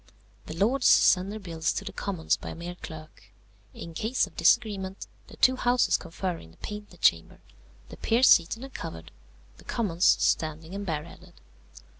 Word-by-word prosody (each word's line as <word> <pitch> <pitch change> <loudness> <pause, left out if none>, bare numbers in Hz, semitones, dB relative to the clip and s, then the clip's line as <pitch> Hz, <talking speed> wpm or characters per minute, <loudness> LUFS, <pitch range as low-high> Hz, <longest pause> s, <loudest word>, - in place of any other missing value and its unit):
The 155 - -6
Lords 235 +9 +2
send 185 +2 +5
their 215 - -5
bills 165 -6 -2
to 200 - -5
the 200 - -7
Commons 185 -6 -1
by - - -9
a - - -7
mere 170 +1 -6
clerk. 155 -3 -12 0.4
In 165 - -9
case 220 +9 0
of - - -17
disagreement, 195 -4 +1 0.2
the - - -14
two 255 - +4
Houses 245 -1 +2
confer 175 +1 -4
in 80 - -14
the 80 - -21
Painted 210 -4 -9
Chamber, 80 -1 +2 0.5
the - - -11
Peers 235 +3 +2
seated 180 +8 +4
and 270 0 -10
covered, 80 -1 -8 0.5
the - - -16
Commons 190 -6 -1
standing 160 +2 +1
and 200 0 -5
bareheaded. 170 +3 -6
185 Hz, 170 wpm, -27 LUFS, 165-210 Hz, 0.5 s, send